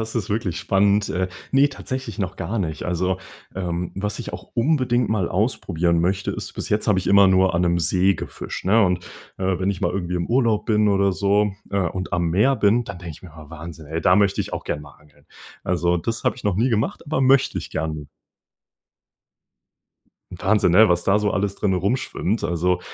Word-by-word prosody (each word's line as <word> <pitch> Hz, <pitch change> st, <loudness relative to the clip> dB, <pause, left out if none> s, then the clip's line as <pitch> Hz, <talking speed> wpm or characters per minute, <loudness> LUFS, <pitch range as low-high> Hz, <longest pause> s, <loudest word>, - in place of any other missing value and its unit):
Das 110 Hz, 0 st, -5 dB
ist 110 Hz, -5 st, -2 dB
wirklich 95 Hz, -5 st, -1 dB
spannend. 100 Hz, +2 st, +2 dB
Äh, 95 Hz, +1 st, -1 dB, 0.2 s
ne, 140 Hz, +2 st, +5 dB
tatsächlich 130 Hz, -5 st, -6 dB
noch 95 Hz, -1 st, -3 dB
gar 105 Hz, +7 st, -3 dB
nicht. 80 Hz, -6 st, -3 dB
Also, 90 Hz, +1 st, -1 dB, 0.4 s
ähm, 90 Hz, -2 st, -3 dB
was 105 Hz, +2 st, -3 dB
ich -, -, -6 dB
auch 95 Hz, +2 st, -9 dB
unbedingt 125 Hz, -3 st, +1 dB
mal 100 Hz, -5 st, 0 dB
ausprobieren 90 Hz, -5 st, 0 dB
möchte, 95 Hz, +3 st, 0 dB
ist -, -, -6 dB
bis -, -, -5 dB
jetzt 105 Hz, +1 st, 0 dB
habe 100 Hz, -3 st, +3 dB
ich 90 Hz, -, -3 dB
immer 100 Hz, 0 st, +6 dB
nur 95 Hz, -1 st, +3 dB
an 85 Hz, -, +2 dB
‘nem 85 Hz, 0 st, +2 dB
See 90 Hz, +3 st, +2 dB
gefischt, -, -, -7 dB
ne, 110 Hz, +4 st, +4 dB
und, 90 Hz, -1 st, 0 dB, 0.3 s
äh, 95 Hz, -1 st, 0 dB
wenn 95 Hz, +1 st, 0 dB
ich 90 Hz, -, -5 dB
mal 85 Hz, -, +1 dB
irgendwie 90 Hz, -1 st, -3 dB
im 85 Hz, -1 st, -1 dB
Urlaub 115 Hz, -3 st, +1 dB
bin 105 Hz, -1 st, +3 dB
oder 100 Hz, -1 st, +2 dB
so, 100 Hz, +2 st, +1 dB, 0.2 s
äh, 100 Hz, 0 st, 0 dB
und 90 Hz, +1 st, -3 dB
am 85 Hz, -1 st, 0 dB
Meer 110 Hz, +10 st, +3 dB
bin, 115 Hz, +4 st, +3 dB
dann 90 Hz, -, -8 dB
denke 85 Hz, -2 st, -8 dB
ich -, -, -15 dB
mir: 85 Hz, -4 st, -12 dB
„Ah, 75 Hz, -1 st, -12 dB
Wahnsinn, 80 Hz, -1 st, -9 dB
ey, 80 Hz, +2 st, -3 dB
da 90 Hz, -, +4 dB
möchte 100 Hz, -1 st, +2 dB
ich -, -, -5 dB
auch -, -, -4 dB
gern 75 Hz, -, -3 dB
mal 75 Hz, -1 st, -13 dB
angeln.“ 75 Hz, -1 st, -25 dB, 0.4 s
Also, 90 Hz, -1 st, +1 dB
das 115 Hz, +7 st, -3 dB
habe -, -, +1 dB
ich 125 Hz, -, -13 dB
noch 100 Hz, -3 st, +1 dB
nie 120 Hz, +5 st, +2 dB
gemacht, 110 Hz, -2 st, -1 dB
aber 150 Hz, -2 st, -1 dB
möchte 135 Hz, 0 st, +3 dB
ich -, -, -8 dB
gerne. 80 Hz, -2 st, -4 dB, 2.2 s
Wahnsinn, 95 Hz, 0 st, +1 dB
ne? 110 Hz, +4 st, +7 dB
Was 90 Hz, 0 st, +1 dB
da 100 Hz, +2 st, +3 dB
so 105 Hz, -1 st, +1 dB
alles 100 Hz, +1 st, -1 dB
drinnen 95 Hz, -3 st, 0 dB
rum 100 Hz, +8 st, +1 dB
schwimmt, 110 Hz, -4 st, -2 dB
also, 90 Hz, +2 st, 0 dB
95 Hz, 215 wpm, -22 LUFS, 90-105 Hz, 2.2 s, ne